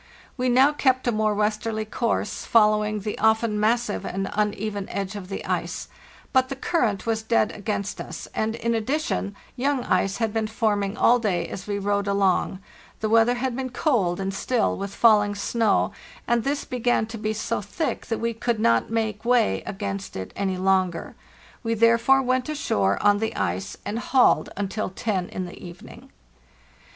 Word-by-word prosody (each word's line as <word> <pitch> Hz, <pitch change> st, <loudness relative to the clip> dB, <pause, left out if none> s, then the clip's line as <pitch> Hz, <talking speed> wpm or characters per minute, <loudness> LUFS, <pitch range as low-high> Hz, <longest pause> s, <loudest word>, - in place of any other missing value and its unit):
We 255 Hz, -1 st, 0 dB
now 265 Hz, +4 st, +5 dB
kept 260 Hz, -3 st, +1 dB
a -, -, +4 dB
more 215 Hz, -1 st, +1 dB
westerly 215 Hz, +1 st, -1 dB
course, 220 Hz, -1 st, -2 dB
following 210 Hz, -1 st, +3 dB
the 210 Hz, +1 st, -4 dB
often 220 Hz, 0 st, +2 dB
massive 225 Hz, 0 st, +1 dB
and 195 Hz, +1 st, -3 dB
uneven 210 Hz, -1 st, -2 dB
edge 195 Hz, 0 st, -4 dB
of 190 Hz, -3 st, -7 dB
the 195 Hz, -, -5 dB
ice; -, -, -3 dB, 0.4 s
but 260 Hz, -1 st, +3 dB
the 275 Hz, -, -3 dB
current 240 Hz, -, 0 dB
was 225 Hz, -1 st, 0 dB
dead 220 Hz, -1 st, +2 dB
against 205 Hz, -1 st, -3 dB
us, -, -, -7 dB
and, 220 Hz, +1 st, -1 dB
in 235 Hz, 0 st, -1 dB
addition, 230 Hz, -3 st, -1 dB, 0.2 s
young 270 Hz, 0 st, 0 dB
ice 190 Hz, +1 st, +1 dB
had 225 Hz, -2 st, -1 dB
been 220 Hz, -1 st, 0 dB
forming 210 Hz, -2 st, 0 dB
all 245 Hz, +1 st, +5 dB
day 180 Hz, -7 st, 0 dB
as 190 Hz, +3 st, -7 dB
we 205 Hz, -1 st, -1 dB
rowed 200 Hz, 0 st, 0 dB
along; 195 Hz, -1 st, +1 dB, 0.4 s
the 215 Hz, -, -1 dB
weather 230 Hz, +2 st, +4 dB
had 250 Hz, 0 st, -2 dB
been 260 Hz, 0 st, -3 dB
cold 235 Hz, -, +1 dB
and 195 Hz, 0 st, -2 dB
still, 240 Hz, +4 st, 0 dB
with 200 Hz, 0 st, -5 dB
falling 210 Hz, -3 st, +4 dB
snow, 215 Hz, +1 st, +1 dB, 0.4 s
and 235 Hz, -1 st, +2 dB
this 280 Hz, +1 st, -1 dB
began 245 Hz, -2 st, +1 dB
to 225 Hz, 0 st, -8 dB
be 215 Hz, 0 st, -1 dB
so 220 Hz, +1 st, -2 dB
thick 205 Hz, -, -3 dB
that 225 Hz, -, -1 dB
we 230 Hz, 0 st, -1 dB
could 230 Hz, 0 st, -1 dB
not 115 Hz, -, +2 dB
make 220 Hz, -2 st, -2 dB
way 235 Hz, -, +2 dB
against 195 Hz, 0 st, -4 dB
it 95 Hz, -1 st, -6 dB
any 190 Hz, -2 st, -1 dB
longer. 185 Hz, -2 st, +1 dB, 0.5 s
We 230 Hz, -1 st, -1 dB
therefore 230 Hz, +4 st, +4 dB
went 255 Hz, +1 st, 0 dB
ashore 100 Hz, -, +1 dB
on 205 Hz, 0 st, +4 dB
the 220 Hz, 0 st, -2 dB
ice, 95 Hz, +2 st, -2 dB
and 210 Hz, +3 st, -2 dB
hauled 255 Hz, +1 st, +3 dB
until 205 Hz, +1 st, -2 dB
ten 190 Hz, -1 st, -2 dB
in 185 Hz, -, -4 dB
the 175 Hz, -, -11 dB
evening. 175 Hz, -1 st, -11 dB
215 Hz, 175 wpm, -24 LUFS, 200-235 Hz, 0.5 s, now